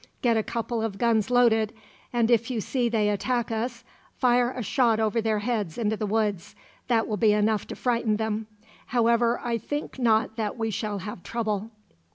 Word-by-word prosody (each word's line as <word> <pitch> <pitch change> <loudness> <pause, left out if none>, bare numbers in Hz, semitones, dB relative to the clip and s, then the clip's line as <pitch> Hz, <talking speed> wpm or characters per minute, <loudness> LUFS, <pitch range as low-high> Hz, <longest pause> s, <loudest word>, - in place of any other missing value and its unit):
Get 235 -2 +3
a 220 - +3
couple 230 +1 -3
of 220 -3 -3
guns 225 -2 +2
loaded, 225 -3 +3 0.4
and 240 -1 +2
if 230 0 +3
you 245 -3 -1
see 240 +2 0
they 220 -2 +1
attack 235 +3 -1
us, 235 +1 -3 0.3
fire 245 -1 +3
a 255 -1 -5
shot 230 +1 +2
over 220 +1 +1
their 220 -1 +1
heads 210 -6 -2
into 220 -2 0
the 215 -1 -3
woods. 205 -4 -1 0.3
That 230 -3 +2
will 215 - -2
be 215 0 +4
enough 210 0 +1
to - - -6
frighten 235 -3 0
them. 220 0 -2 0.4
However, 235 0 +2
I 235 -1 -1
think 290 +3 -5
not 220 -2 +2
that 215 0 -2
we 225 -1 -1
shall 210 0 -3
have 210 -3 -6
trouble." 220 -1 -2
225 Hz, 190 wpm, -26 LUFS, 215-240 Hz, 0.4 s, be